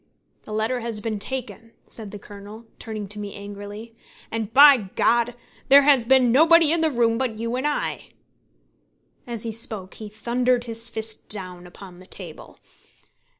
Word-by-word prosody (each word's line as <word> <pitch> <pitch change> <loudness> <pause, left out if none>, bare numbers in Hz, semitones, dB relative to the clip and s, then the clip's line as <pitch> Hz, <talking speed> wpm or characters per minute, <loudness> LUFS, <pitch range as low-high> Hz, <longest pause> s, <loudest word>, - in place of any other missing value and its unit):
"The - - -12
letter 220 +4 -1
has 230 -2 -1
been 215 0 -3
taken," 230 -1 -5
said 220 -3 -7
the 205 - -8
Colonel, 205 +2 -12
turning 215 -3 -6
to 210 +1 -3
me 205 -1 -6
angrily, 205 +3 -9 0.4
"and, 225 -1 -3
by 270 -6 +7
G! 235 +1 +2 0.4
there 280 +1 +8
has 275 -5 +4
been 255 -1 +4
nobody 325 +3 +6
in 335 0 +1
the 320 - +3
room 235 -3 +1
but 250 -5 -2
you 230 +2 -3
and 260 +3 -1
I." 160 - -3 1.2
As 235 -3 -4
he 230 - -3
spoke, 215 -4 -5
he 215 -1 -8
thundered 240 +3 0
his 230 0 -1
fist 220 -1 -5
down 180 -3 -6
upon 180 0 -13
the 185 - -15
table. - - -8
225 Hz, 165 wpm, -23 LUFS, 210-250 Hz, 1.2 s, there